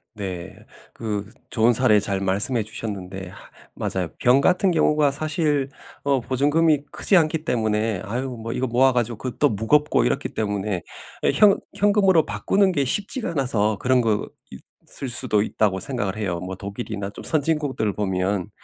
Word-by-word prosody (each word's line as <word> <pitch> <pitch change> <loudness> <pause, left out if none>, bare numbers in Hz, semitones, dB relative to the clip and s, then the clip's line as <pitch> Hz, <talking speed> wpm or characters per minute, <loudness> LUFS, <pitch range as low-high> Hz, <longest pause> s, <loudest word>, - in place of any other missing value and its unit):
네. 95 -2 -6 0.4
그 105 -2 -4 0.2
좋은 115 +1 +3
사례 110 -3 +4
잘 100 -1 -1
말씀해 105 +5 +1
주셨는데 100 -4 -6
하 90 - -14 0.3
맞아요. 90 -3 -2
병 125 +3 +4
같은 185 +4 +3
경우가 150 -3 +3
사실 150 -2 0 0.3
어 140 -1 +2
보증금이 145 +5 +2
크지 200 - +1
않기 160 -2 +2
때문에 110 -4 0
아유 120 +2 -4
이거 130 - -1
모아 130 +3 +4
가지고 120 -2 -1
그거 125 0 -6
또 145 - +5
무겁고 115 +8 +2
이렇기 - - -1
때문에 100 -3 -2 0.4
예 - - +3
'현 205 -2 +5 0.2
현금으로 195 -5 +3
바꾸는 190 - +1
게 140 - +1
쉽지가 205 - -1
않아서 115 -8 0
그런 130 0 +2
것일 110 -3 0 0.8
수도 120 -3 +2
있다.'고 105 -2 0
생각을 105 -4 -3
해요. 95 -5 -2
뭐 95 +1 -5
독일이나 100 0 -5
좀 - - -10
선진국들 145 -8 0
보면 95 -1 -1
115 Hz, 325 characters per minute, -23 LUFS, 100-145 Hz, 0.8 s, 또